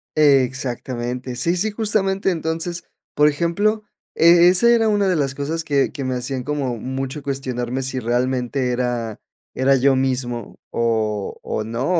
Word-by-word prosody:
Exactamente. 125 Hz, -3 st, 0 dB
Sí, 170 Hz, +8 st, 0 dB
sí, 215 Hz, +4 st, 0 dB
justamente. 195 Hz, -3 st, +2 dB
Entonces, 165 Hz, +1 st, -3 dB, 0.3 s
por 150 Hz, 0 st, +5 dB
ejemplo, 190 Hz, +8 st, 0 dB, 0.3 s
eh, 170 Hz, +1 st, +6 dB
esa 210 Hz, +6 st, +5 dB
era 230 Hz, -2 st, +4 dB
una 205 Hz, -2 st, +2 dB
de 185 Hz, -, +2 dB
las 135 Hz, -3 st, -1 dB
cosas 155 Hz, +3 st, -3 dB
que 140 Hz, -3 st, +1 dB
que 140 Hz, -, -6 dB
me 130 Hz, -1 st, -2 dB
hacían 125 Hz, +1 st, -4 dB
como 135 Hz, -4 st, -2 dB
mucho 135 Hz, +4 st, -5 dB
cuestionarme 130 Hz, -2 st, -3 dB
si 130 Hz, 0 st, -3 dB
realmente 125 Hz, +2 st, -1 dB
era 120 Hz, -3 st, -2 dB, 0.3 s
era 135 Hz, +1 st, +3 dB
yo 135 Hz, +1 st, +3 dB
mismo 125 Hz, -3 st, -2 dB
o 110 Hz, -3 st, -1 dB
o 110 Hz, -, -3 dB
no, 115 Hz, +4 st, -3 dB
135 Hz, 150 wpm, -21 LUFS, 125-165 Hz, 0.3 s, eh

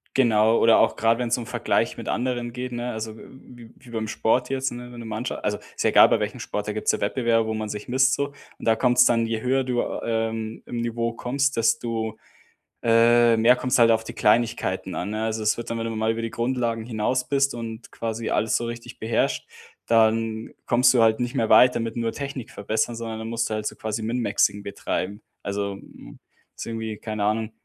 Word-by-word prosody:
genau, 115 Hz, -3 st, +4 dB
oder 115 Hz, 0 st, +6 dB
auch 110 Hz, -, +3 dB
grad, 115 Hz, +1 st, +2 dB
wenn 120 Hz, -2 st, -2 dB
's -, -, +2 dB
um 120 Hz, -, -6 dB
Vergleich -, -, 0 dB
mit -, -, -6 dB
anderen 120 Hz, 0 st, -2 dB
geht, 125 Hz, +1 st, -5 dB
ne, 120 Hz, +1 st, -3 dB
also 110 Hz, 0 st, -5 dB
w -, -, -13 dB
w 120 Hz, -3 st, -14 dB
wie 125 Hz, -, -16 dB
beim 110 Hz, -2 st, -3 dB
Sport 125 Hz, +3 st, +1 dB
jetzt, 135 Hz, -1 st, -1 dB
ne? 120 Hz, 0 st, -8 dB
Wenn 120 Hz, -1 st, -10 dB
du 115 Hz, -, -8 dB
Mannsch 110 Hz, +3 st, -3 dB
also, 105 Hz, 0 st, -2 dB, 0.2 s
ist -, -, -2 dB
ja -, -, +4 dB
egal, -, -, +8 dB
bei -, -, +3 dB
welchem -, -, -4 dB
Sport, -, -, -4 dB
da -, -, -2 dB
gibt's -, -, 0 dB
ja -, -, -3 dB
Wettbewerbe, 115 Hz, -3 st, +1 dB
wo 110 Hz, -, -2 dB
man 110 Hz, -1 st, -3 dB
sich 105 Hz, 0 st, -6 dB
misst 130 Hz, +1 st, +3 dB
so 140 Hz, 0 st, -2 dB, 0.3 s
und -, -, -9 dB
da 115 Hz, -, +5 dB
kommt's 125 Hz, +1 st, +4 dB
dann 115 Hz, -1 st, +3 dB
je 115 Hz, -1 st, -3 dB
höher 130 Hz, +1 st, +1 dB
du, 125 Hz, -1 st, 0 dB, 0.2 s
ähm, 110 Hz, -1 st, -2 dB
im 120 Hz, -, -5 dB
Niveau 115 Hz, 0 st, -2 dB
kommst, 135 Hz, +3 st, -1 dB
desto, 115 Hz, -1 st, 0 dB, 0.7 s
äh, 115 Hz, 0 st, +5 dB
mehr 115 Hz, +3 st, +5 dB
kommt's 125 Hz, 0 st, 0 dB
halt 115 Hz, -1 st, +6 dB
auf 110 Hz, 0 st, +2 dB
die -, -, -8 dB
Kleinigkeiten 115 Hz, +2 st, +1 dB
an, 100 Hz, -, -3 dB
ne 110 Hz, +1 st, -3 dB
Also, 110 Hz, 0 st, -2 dB
es 105 Hz, -, +2 dB
wird 120 Hz, -, -6 dB
dann, 115 Hz, -, -2 dB
wenn 115 Hz, -, -3 dB
du 115 Hz, -, -2 dB
dann 110 Hz, -, -4 dB
mal 110 Hz, 0 st, +1 dB
über 115 Hz, 0 st, -4 dB
die 115 Hz, -, -3 dB
Grundlagen 120 Hz, -2 st, -1 dB
hinaus 125 Hz, +3 st, -1 dB
bist 140 Hz, -1 st, +2 dB
und 115 Hz, -1 st, -7 dB
quasi 115 Hz, 0 st, -4 dB
alles 110 Hz, -, +1 dB
so 120 Hz, -, -2 dB
richtig 120 Hz, +1 st, -7 dB
beherrscht, 110 Hz, 0 st, 0 dB, 0.4 s
dann 115 Hz, 0 st, +2 dB, 0.2 s
kommst 125 Hz, +2 st, +4 dB
du 120 Hz, -, +5 dB
halt 110 Hz, 0 st, +3 dB
nicht 120 Hz, 0 st, -2 dB
mehr 110 Hz, -, 0 dB
weiter 125 Hz, -1 st, +6 dB
mit 115 Hz, -1 st, -3 dB
nur 115 Hz, -1 st, 0 dB
Technik 140 Hz, -4 st, -6 dB
verbessern, 110 Hz, +3 st, -2 dB
sondern 115 Hz, -1 st, -5 dB
dann 110 Hz, 0 st, -6 dB
musst 115 Hz, 0 st, -1 dB
du 110 Hz, -, -1 dB
halt 105 Hz, 0 st, -3 dB
so -, -, -3 dB
quasi 110 Hz, 0 st, -4 dB
Min-Maxing 105 Hz, -3 st, 0 dB
betreiben. 100 Hz, 0 st, -4 dB, 0.2 s
Also, 100 Hz, 0 st, -2 dB
m -, -, -13 dB, 0.4 s
ist -, -, -6 dB
irgendwie 110 Hz, -1 st, -4 dB
keine 110 Hz, -2 st, -3 dB
Ahnung, 110 Hz, +1 st, 0 dB
115 Hz, 230 wpm, -24 LUFS, 110-120 Hz, 0.7 s, egal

